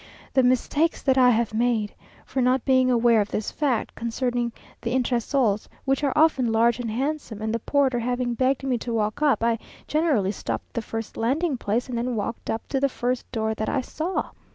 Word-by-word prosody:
The 265 - +5
mistakes 255 +6 +1
that 265 -2 +3
I 250 -1 +7
have 230 -2 +1
made! 225 -2 +1 0.3
for 265 - -2
not 255 0 +2
being 260 -1 +4
aware 235 -2 +4
of 205 - -3
this 215 - -3
fact 265 -7 -1
concerning 240 +1 -2 0.3
the 240 +1 -1
entresols, 240 -3 +1 0.2
which 270 +1 +1
are 280 - +2
often 275 -7 +3
large 230 +1 +3
and 240 -2 -3
handsome, 260 -1 -3
and 220 +1 -2
the 230 - 0
porter 265 0 +1
having 245 +1 -1
begged 260 +2 +1
me 255 -3 0
to 235 +1 -4
walk 215 +4 -1
up, 290 -6 +3
I 230 -1 +2 0.3
generally 295 - +2
stopped - - -4
at - - -39
the 235 - -1
first 225 0 -6
landing 275 +7 +1
place, 235 +1 -1
and 250 - -4
then 240 +1 -1
walked 225 +2 -4
up 225 - -3
to 270 - 0
the 275 +1 +2
first 250 -1 -3
door 220 -2 -1
that 215 0 -3
I 270 - 0
saw. 320 +8 -3
245 Hz, 205 wpm, -25 LUFS, 225-265 Hz, 0.3 s, I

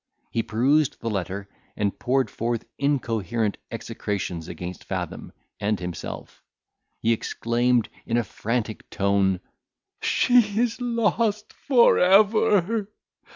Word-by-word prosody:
He 115 - +1
perused 135 +7 +2
the 115 - -3
letter, 100 0 -3 0.3
and 100 -1 -1
poured 130 +1 +1
forth 115 0 -2
incoherent 115 -6 0
execrations 90 -5 -4
against 90 -1 -7
Fathom - - -5 0.3
and 105 -1 0
himself. 90 -2 -7 0.6
He 115 - +2
exclaimed, 120 +1 +1 0.2
in 115 - +1
a 120 - +2
frantic 110 +1 -3
tone, 100 -2 +1 0.6
"She 230 -4 +3
is 240 +1 0
lost 230 -3 0
for 250 -4 +4
ever! 205 +1 +4
120 Hz, 110 wpm, -25 LUFS, -, 0.6 s, for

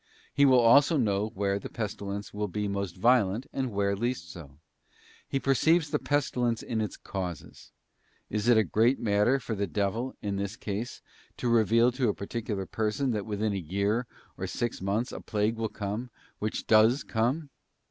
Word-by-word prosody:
He 140 - +5
will 130 -2 +6
also 140 +7 +6
know 105 -4 +1
where 100 0 0
the - - -7
pestilence 100 -2 -5
will 105 0 -2
be 105 +2 -2
most 100 -3 -3
violent 115 +1 +3
and 130 -2 -2
where 100 -1 0
least 110 -6 -3
so. 70 -5 -11 0.7
He 135 - -1
perceives 150 +4 +2
the - - +1
pestilence 125 -5 0
in 115 -2 -2
its 105 - -4
causes. 90 -9 -6 0.6
Is 105 +2 -2
it 120 -2 +6
a 110 - +5
great 115 - +2
matter 105 +5 +2
for 120 - -4
the 100 -1 -1
devil, 105 +7 -2
in 100 -2 -3
this 100 +1 -3
case, 110 +1 -5 0.3
to - - -2
reveal 115 +1 +4
to 125 -2 0
a - - -1
particular 105 -1 -4
person 110 +7 -1
that 105 -3 -3
within 105 0 -1
a - - -1
year 100 +7 -1 0.3
or - - -2
six 120 -4 -3
months 100 +5 -1
a - - -7
plague 110 +1 -1
will 110 -1 -1
come, 105 +5 -4 0.3
which 110 +1 -3
does 110 +5 +5
come? 130 +6 -1
110 Hz, 180 wpm, -28 LUFS, 100-120 Hz, 0.7 s, will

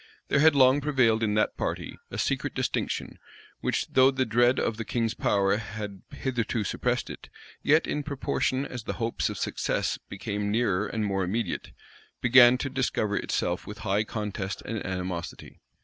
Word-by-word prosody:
There 140 - +3
had 155 0 +6
long 135 +1 +5
prevailed 130 -6 +2
in 105 -2 +1
that 105 - +1
party - - -3
a - - -6
secret - - -1
distinction, - - -2 0.4
which, - - 0
though 130 0 +6
the 135 -1 0
dread 120 +3 +3
of 110 - -1
the 115 - -3
king's 115 -1 -1
power 100 -2 +2
had 105 -3 -6
hitherto 120 -4 -2
suppressed - - -1
it, - - -11 0.3
yet, 155 +3 +4
in 150 - -2
proportion 140 -1 -1
as 125 -5 -7
the - - -2
hopes 115 -1 -1
of - - -5
success - - -1
became 100 0 -3
nearer 105 -3 +1
and 110 -1 -2
more 95 -1 0
immediate, 100 +1 -2 0.5
began 125 0 +7
to 135 - -3
discover 125 -6 0
itself 90 -3 -1
with 105 - -7
high 100 +1 +2
contest 105 -3 -4
and 110 -1 -3
animosity. 90 -2 -5
115 Hz, 165 wpm, -27 LUFS, 105-130 Hz, 0.5 s, began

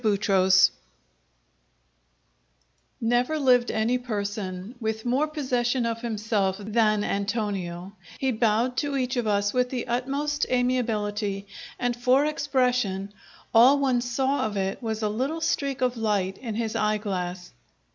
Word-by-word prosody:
Chapter 200 -3 +2
Eight 185 -1 +6 2.3
Never 245 +6 +1
lived 250 -4 +3
any 230 +3 +1
person 205 -3 -4
with 220 -1 -3
more 265 +5 +1
possession 255 -5 -1
of 230 0 -2
himself 210 -4 -1
than 215 0 +1
Antonio; 200 -3 -3 0.2
he 265 -1 0
bowed 230 +2 +1
to 285 -2 0
each 255 0 -1
of 240 -3 -1
us 205 -1 +1
with 250 0 +1
the 250 -2 -3
utmost 275 +5 -1
amiability; 215 -5 0 0.3
and 245 -1 -1
for 255 +4 +3
expression 250 -10 0 0.4
all 245 +5 +7
one 260 -3 +1
saw 260 +1 0
of 205 -1 -5
it 195 +4 -2
was 220 -2 -3
a - - +2
little 260 +10 -2
streak 280 -5 -1
of 250 -1 +1
light 205 -4 -1
in 230 -4 -5
his 225 -1 -2
eye 215 0 +1
glass. 180 -3 -4
230 Hz, 135 wpm, -26 LUFS, 205-255 Hz, 2.3 s, all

